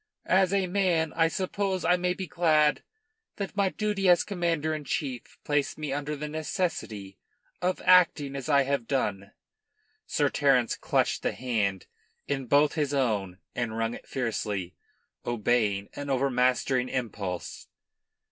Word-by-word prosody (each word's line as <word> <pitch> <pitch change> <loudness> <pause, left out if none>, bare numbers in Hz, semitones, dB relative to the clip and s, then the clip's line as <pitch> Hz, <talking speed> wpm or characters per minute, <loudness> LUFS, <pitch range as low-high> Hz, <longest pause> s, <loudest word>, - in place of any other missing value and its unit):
"As 190 0 +3
a 195 -1 +2
man, 175 -4 +1
I 165 -1 +3
suppose 190 +2 -2
I 180 - +5
may 180 0 0
be 190 - -4
glad 155 -3 +3 0.5
that 200 -1 -5
my 200 -1 +2
duty 205 -2 0
as 175 -1 +6
Commander 170 -5 -1
in 155 -1 -4
Chief 130 -2 -4
placed 145 -1 0
me 150 -3 -3
under 145 +1 -3
the 150 +1 -5
necessity 150 - -3 0.4
of 180 +1 -1
acting 165 -6 +4
as 135 +1 -5
I 140 -2 +5
have 135 -3 -1
done." 100 -7 -1 0.8
Sir - - +2
Terence 135 -5 +2
clutched - - 0
the - - -1
hand 105 -7 -1 0.4
in 135 -3 -2
both 145 +3 +4
his 145 -3 -1
own 105 -9 0 0.2
and 115 -2 -3
wrung 115 +1 0
it - - -10
fiercely, 105 -8 -3 0.5
obeying 110 -4 0
an 145 0 -6
overmastering 130 -1 +1
impulse. 105 -8 -4
140 Hz, 145 wpm, -28 LUFS, 120-175 Hz, 0.8 s, as